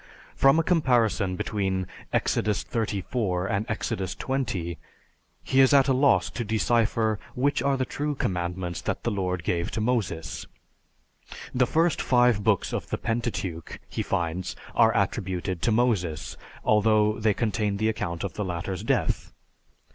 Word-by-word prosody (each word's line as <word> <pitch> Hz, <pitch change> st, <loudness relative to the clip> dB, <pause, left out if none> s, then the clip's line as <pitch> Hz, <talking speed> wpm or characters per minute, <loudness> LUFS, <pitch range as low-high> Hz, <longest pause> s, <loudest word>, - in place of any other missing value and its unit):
From 135 Hz, +3 st, +5 dB
a 165 Hz, -, +3 dB
comparison 120 Hz, -, +2 dB
between 95 Hz, -2 st, -1 dB, 0.3 s
Exodus 105 Hz, -2 st, +1 dB
XXXIV 100 Hz, -3 st, -1 dB
and 100 Hz, +2 st, -1 dB
Exodus 95 Hz, -3 st, -2 dB
XX, 95 Hz, -11 st, -2 dB, 0.7 s
he 135 Hz, -, +1 dB
is 135 Hz, +1 st, +6 dB
at 135 Hz, -1 st, +5 dB
a 135 Hz, -, +4 dB
loss 135 Hz, +2 st, +3 dB
to 120 Hz, -, -3 dB
decipher 110 Hz, 0 st, +1 dB, 0.2 s
which 140 Hz, +3 st, +1 dB
are 140 Hz, -1 st, +1 dB
the 130 Hz, -, 0 dB
true 145 Hz, +3 st, -3 dB
commandments 90 Hz, -4 st, -2 dB
that -, -, -3 dB
the 120 Hz, -, 0 dB
Lord 90 Hz, -3 st, -2 dB
gave 85 Hz, -1 st, -1 dB
to -, -, -3 dB
Moses. 105 Hz, -8 st, -2 dB, 1.1 s
The 125 Hz, -1 st, +3 dB
first 165 Hz, 0 st, +2 dB
five 120 Hz, -4 st, +3 dB
books 100 Hz, -4 st, +1 dB
of -, -, -3 dB
the -, -, -1 dB
Pentateuch, 115 Hz, -8 st, -3 dB
he -, -, -3 dB
finds, 85 Hz, +1 st, -2 dB, 0.2 s
are 115 Hz, -1 st, +5 dB
attributed 95 Hz, -3 st, -1 dB
to 115 Hz, -, +2 dB
Moses, 100 Hz, -10 st, 0 dB, 0.3 s
although 105 Hz, 0 st, +3 dB
they 110 Hz, -2 st, +2 dB
contain 105 Hz, -2 st, 0 dB
the 110 Hz, +2 st, +1 dB
account 95 Hz, -6 st, -3 dB
of 100 Hz, -, -3 dB
the 105 Hz, -, -3 dB
latter's 90 Hz, 0 st, -3 dB
death. -, -, 0 dB
105 Hz, 145 wpm, -26 LUFS, 95-120 Hz, 1.1 s, is